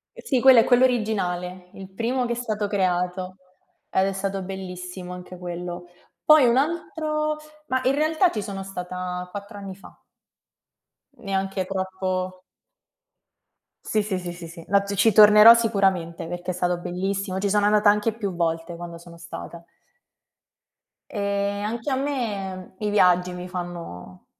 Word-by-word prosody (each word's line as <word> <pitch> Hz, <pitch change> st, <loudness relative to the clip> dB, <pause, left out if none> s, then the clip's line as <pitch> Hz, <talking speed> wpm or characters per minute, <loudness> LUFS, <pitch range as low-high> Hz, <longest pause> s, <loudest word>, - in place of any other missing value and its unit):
Eh -, -, -10 dB
sì, 260 Hz, -3 st, +2 dB
quello 260 Hz, -2 st, +8 dB
è -, -, +6 dB
quello 245 Hz, 0 st, +4 dB
originale, 185 Hz, -6 st, -2 dB
il 190 Hz, -1 st, -10 dB
primo 240 Hz, +6 st, -1 dB
che 240 Hz, -, -3 dB
è -, -, -3 dB
stato 215 Hz, -4 st, -2 dB
creato 185 Hz, -1 st, -1 dB, 0.5 s
ed 190 Hz, -, +2 dB
è 195 Hz, -, -2 dB
stato 195 Hz, 0 st, -3 dB
bellissimo, 180 Hz, -1 st, -7 dB
anche 180 Hz, 0 st, -9 dB
quello. 175 Hz, 0 st, -6 dB, 0.4 s
Poi 305 Hz, -4 st, +7 dB
un 235 Hz, +2 st, +3 dB
altro 305 Hz, 0 st, -1 dB, 0.3 s
ma 260 Hz, 0 st, 0 dB
in 260 Hz, -, +3 dB
realtà 315 Hz, +4 st, +3 dB
ci 215 Hz, -, -3 dB
sono 195 Hz, -1 st, -5 dB
stata 180 Hz, -1 st, -5 dB
4 205 Hz, +1 st, -8 dB
anni 195 Hz, -1 st, -7 dB
fa. 195 Hz, -, -16 dB, 1.2 s
Neanche 195 Hz, -2 st, -2 dB
troppo 185 Hz, -1 st, -3 dB, 1.4 s
Sì, 215 Hz, -, +1 dB
sì, 200 Hz, -3 st, -2 dB
sì, 175 Hz, -1 st, -6 dB
sì, 170 Hz, -1 st, -9 dB
sì. 165 Hz, 0 st, -11 dB
Ma 200 Hz, +1 st, +4 dB
t 200 Hz, 0 st, -4 dB
ci 215 Hz, +3 st, +4 dB
tornerò 210 Hz, +2 st, +9 dB
sicuramente, 195 Hz, -8 st, 0 dB
perché 175 Hz, +1 st, -4 dB
è -, -, -4 dB
stato 180 Hz, 0 st, 0 dB
bellissimo. 190 Hz, +2 st, -3 dB
Ci 200 Hz, +1 st, 0 dB
sono 205 Hz, 0 st, +2 dB
andata 210 Hz, 0 st, +5 dB
anche 210 Hz, +2 st, +2 dB
più 200 Hz, -5 st, -4 dB
volte, 165 Hz, 0 st, -2 dB
quando 170 Hz, 0 st, -8 dB
sono 170 Hz, 0 st, -14 dB
stata. 170 Hz, 0 st, -9 dB, 1.5 s
E, 200 Hz, 0 st, -1 dB
anche 230 Hz, +4 st, -3 dB
a 265 Hz, -, +1 dB
me, 205 Hz, -10 st, -3 dB
i 210 Hz, -, -1 dB
viaggi 180 Hz, -3 st, +3 dB
mi 180 Hz, 0 st, -7 dB
fanno 170 Hz, -, -7 dB
195 Hz, 155 wpm, -24 LUFS, 180-215 Hz, 1.5 s, tornerò